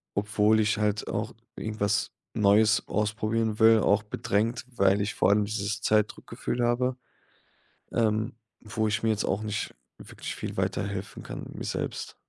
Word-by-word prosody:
obwohl 105 Hz, +1 st, +3 dB
ich 110 Hz, 0 st, +2 dB
halt 105 Hz, 0 st, 0 dB
auch 110 Hz, +2 st, -3 dB, 0.2 s
irgendwas 105 Hz, -1 st, -1 dB, 0.2 s
Neues 105 Hz, +1 st, +4 dB
ausprobieren 110 Hz, +1 st, 0 dB
will, 110 Hz, 0 st, +7 dB
auch 100 Hz, +1 st, +3 dB
bedrängt, 110 Hz, +3 st, -1 dB
weil 100 Hz, 0 st, +4 dB
ich 100 Hz, +1 st, -1 dB
vor -, -, +2 dB
allem 105 Hz, +1 st, +4 dB
dieses 105 Hz, +1 st, -2 dB
Zeitdruck-Gefühl 110 Hz, +3 st, 0 dB
habe, 125 Hz, +2 st, +1 dB, 0.9 s
ähm, 110 Hz, -1 st, +1 dB, 0.3 s
wo 110 Hz, 0 st, -1 dB
ich 110 Hz, +1 st, -1 dB
mir 115 Hz, -, +2 dB
jetzt 105 Hz, -2 st, +1 dB
auch 95 Hz, -, 0 dB
nicht 105 Hz, 0 st, -3 dB, 0.2 s
wirklich -, -, -7 dB
viel -, -, -5 dB
weiterhelfen 100 Hz, -1 st, -3 dB
kann -, -, -7 dB
mir -, -, -6 dB
selbst. -, -, -4 dB
105 Hz, 145 wpm, -28 LUFS, 105-110 Hz, 0.9 s, will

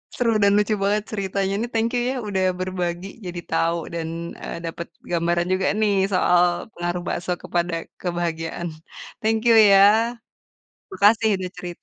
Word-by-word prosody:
Seru 235 Hz, -2 st, +1 dB
dan 200 Hz, -, +5 dB
lucu 210 Hz, +1 st, +1 dB
banget 205 Hz, +1 st, +1 dB
ceritanya. 195 Hz, 0 st, -1 dB
Ini 235 Hz, -, -2 dB
thank 225 Hz, +1 st, +1 dB
you 240 Hz, -, +1 dB
ya 265 Hz, -, -3 dB
udah 190 Hz, -2 st, 0 dB, 0.2 s
berbagi 180 Hz, 0 st, -3 dB, 0.2 s
jadi 175 Hz, -1 st, -5 dB
tahu 165 Hz, +1 st, +1 dB, 0.2 s
dan, 165 Hz, -1 st, -3 dB, 0.4 s
eee, -, -, -5 dB
dapet 170 Hz, +1 st, -5 dB, 0.2 s
gambaran 175 Hz, 0 st, +1 dB
juga 185 Hz, 0 st, 0 dB
nih, 210 Hz, -2 st, +3 dB, 0.2 s
soal 180 Hz, 0 st, +2 dB
pengaruh 175 Hz, 0 st, -3 dB
bakso 180 Hz, +1 st, -3 dB
kepada 175 Hz, 0 st, -1 dB, 0.3 s
kebahagiaan. 170 Hz, -1 st, -3 dB, 0.6 s
Thank 220 Hz, 0 st, +2 dB
you 230 Hz, -, +6 dB
ya. 200 Hz, -3 st, +7 dB, 1.1 s
Makasih 215 Hz, +3 st, +4 dB
udah 185 Hz, -1 st, -4 dB
cerita. 175 Hz, -1 st, -8 dB
185 Hz, 150 wpm, -23 LUFS, 175-205 Hz, 1.1 s, ya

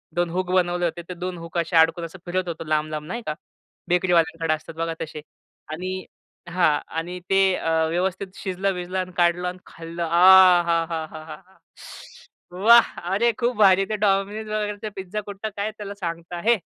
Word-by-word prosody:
2 175 Hz, 0 st, +1 dB
hook 180 Hz, +1 st, -2 dB
बनवले 175 Hz, -1 st, +1 dB
होते 170 Hz, +1 st, -3 dB
ते -, -, -4 dB
2 180 Hz, 0 st, -5 dB
हूक 170 Hz, +1 st, -7 dB
असे 170 Hz, +1 st, -1 dB
अडकून 165 Hz, +1 st, +4 dB
असं 170 Hz, +3 st, -11 dB
फिरत 185 Hz, +1 st, -2 dB
होतो 165 Hz, -1 st, -5 dB
लांब-लांब 155 Hz, 0 st, -1 dB
नाही 235 Hz, +7 st, -4 dB
का 155 Hz, -, -1 dB, 0.6 s
बेकरीवाल्यांकडे 165 Hz, -3 st, +2 dB
असतात 155 Hz, +1 st, -7 dB
बघा 165 Hz, 0 st, -2 dB
तसे. 155 Hz, -1 st, -6 dB, 0.5 s
आणि 185 Hz, +3 st, -4 dB, 0.4 s
हां. 170 Hz, -4 st, +2 dB, 0.2 s
आणि 175 Hz, +2 st, -4 dB
ते 195 Hz, 0 st, +4 dB
अ, 165 Hz, -, -3 dB, 0.2 s
व्यवस्थित 185 Hz, +3 st, -1 dB
शिजलं-विजलं 185 Hz, -1 st, -3 dB
आणि 185 Hz, 0 st, -4 dB
काढलं 175 Hz, +1 st, +2 dB
आणि 180 Hz, +1 st, -5 dB
खाल्लं. 165 Hz, +1 st, -7 dB
आ, 180 Hz, +1 st, +7 dB
हा, 165 Hz, -1 st, +2 dB
हा, 160 Hz, -1 st, -3 dB
हा, 155 Hz, -1 st, -9 dB
हा, 155 Hz, -1 st, -8 dB
हा. 190 Hz, 0 st, -26 dB, 0.9 s
वाह! 225 Hz, +6 st, +6 dB, 0.3 s
अरे 235 Hz, +4 st, +3 dB
खूप 240 Hz, +1 st, 0 dB
भारी. 195 Hz, -2 st, +5 dB
ते 215 Hz, -, -1 dB
Domino's 205 Hz, +2 st, 0 dB
वगैरेचा 210 Hz, 0 st, -3 dB
पिझ्झा 195 Hz, +2 st, -5 dB
कुठला 205 Hz, +2 st, -5 dB
काय 205 Hz, +2 st, -2 dB
त्याला 205 Hz, -1 st, -6 dB
सांगता. 170 Hz, -2 st, -5 dB
हे, 235 Hz, 0 st, +5 dB
180 Hz, 175 wpm, -23 LUFS, 165-195 Hz, 0.9 s, आ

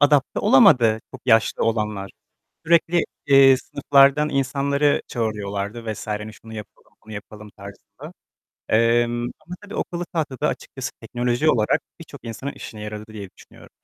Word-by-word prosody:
adapte 145 Hz, -2 st, +3 dB
olamadı, 115 Hz, -4 st, +5 dB
çok -, -, -11 dB
yaşlı 110 Hz, -3 st, +3 dB
olanlar. 105 Hz, -3 st, -2 dB, 0.6 s
Sürekli, 170 Hz, 0 st, +3 dB, 0.2 s
eee, 135 Hz, -1 st, +7 dB
sınıflardan 140 Hz, +2 st, +3 dB
insanları 140 Hz, +1 st, +1 dB
çağırıyorlardı 110 Hz, 0 st, -3 dB
vs. 105 Hz, -, -9 dB
Hani 105 Hz, 0 st, -4 dB
şunu 110 Hz, +1 st, -14 dB
yapalım, 105 Hz, -2 st, -11 dB
bunu 110 Hz, -, -12 dB
yapalım 105 Hz, +1 st, -10 dB
tarzında. 100 Hz, 0 st, -12 dB, 0.6 s
Emm, 120 Hz, +1 st, +2 dB, 0.2 s
ama 180 Hz, -, -9 dB
tabii 205 Hz, +1 st, -10 dB
akıllı 175 Hz, 0 st, -3 dB
tahta 155 Hz, -7 st, -4 dB
da -, -, +1 dB
açıkçası -, -, -5 dB
teknoloji 125 Hz, +5 st, 0 dB
olarak, 110 Hz, -7 st, +2 dB, 0.2 s
birçok -, -, -12 dB
insanın 120 Hz, +5 st, -6 dB
çok -, -, -15 dB
işine 105 Hz, -1 st, -8 dB
yaradı 105 Hz, 0 st, -7 dB
diye 100 Hz, -3 st, -8 dB
düşünüyorum. -, -, -17 dB
120 Hz, 145 wpm, -22 LUFS, 105-140 Hz, 0.6 s, eee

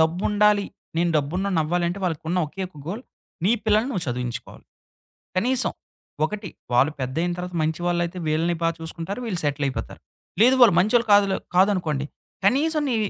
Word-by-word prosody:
డబ్బుండాలి. 205 Hz, +5 st, +3 dB, 0.3 s
నేను 170 Hz, 0 st, +2 dB
డబ్బున్నోడినవ్వాలంటే 175 Hz, +2 st, 0 dB
వాళ్ళకున్న 165 Hz, +1 st, -1 dB
ఒకే 190 Hz, +6 st, -6 dB
ఒక్క 160 Hz, -5 st, -16 dB
గోల్ 220 Hz, +7 st, -4 dB, 0.4 s
నీ 205 Hz, -, +4 dB
పిల్లలని 215 Hz, +4 st, +3 dB
నువ్వు 185 Hz, -8 st, -2 dB
చదివించుకోవాలి. 125 Hz, -1 st, -5 dB, 0.7 s
కనీసం, 250 Hz, +5 st, +2 dB, 0.5 s
ఒకటి 205 Hz, +3 st, -4 dB, 0.3 s
వాళ్ళు 140 Hz, +5 st, +4 dB
పెద్దయిన 160 Hz, +8 st, -1 dB
తర్వాత 180 Hz, 0 st, -5 dB
మంచి 160 Hz, +2 st, -1 dB
వాళ్ళైతే 175 Hz, +1 st, -1 dB
వీళ్ళని 165 Hz, +2 st, +1 dB
బాగా 165 Hz, 0 st, +1 dB
చూసుకుంటారు. 165 Hz, +6 st, -5 dB
వీళ్ళు 185 Hz, -6 st, -1 dB
సెటిలయిపోతారు. 140 Hz, -2 st, -2 dB, 0.4 s
లేదు 255 Hz, +2 st, +6 dB
వాళ్ళు 210 Hz, -7 st, +7 dB
మంచోళ్ళు 230 Hz, +4 st, +2 dB
కాదులే 200 Hz, -1 st, +5 dB, 0.2 s
కాదనుకోండి, 175 Hz, -8 st, +2 dB, 0.4 s
కనీసం 305 Hz, +7 st, +2 dB
నీ 235 Hz, -, +1 dB
180 Hz, 135 wpm, -24 LUFS, 160-205 Hz, 0.7 s, వాళ్ళు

